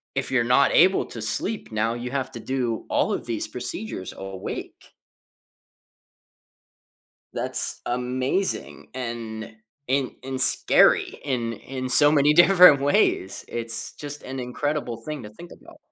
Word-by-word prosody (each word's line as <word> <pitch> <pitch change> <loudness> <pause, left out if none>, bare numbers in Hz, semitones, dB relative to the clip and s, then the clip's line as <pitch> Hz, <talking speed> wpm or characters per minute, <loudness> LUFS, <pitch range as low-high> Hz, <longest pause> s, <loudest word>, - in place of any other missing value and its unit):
if 135 0 -2
you're 130 -3 +2
not 140 - +3
able 185 +3 +4
to 115 - -8
sleep, 195 - -1
now 110 +1 -1
you 120 +1 -6
have 135 -2 -3
to 120 - -8
do 125 -4 -3
all - - 0
of - - -5
these 115 -2 -4
procedures 125 - -6
awake. 95 -1 -9 2.4
That's - - +1
amazing 130 +9 -2
and 115 -3 -7 0.3
and 135 0 -1
and 130 0 -5
scary - - +5
in 120 -5 -3
in 130 +1 -7
so 145 +4 +6
many 150 0 +3
different 175 -4 +6
ways. 140 -8 0
It's 115 -1 -3
just 145 0 -7
an 130 0 -7
incredible 125 -1 -4
thing 140 +2 -8
to 105 - -9
think 170 +12 -14
about. - - -16
130 Hz, 135 wpm, -23 LUFS, 115-145 Hz, 2.4 s, so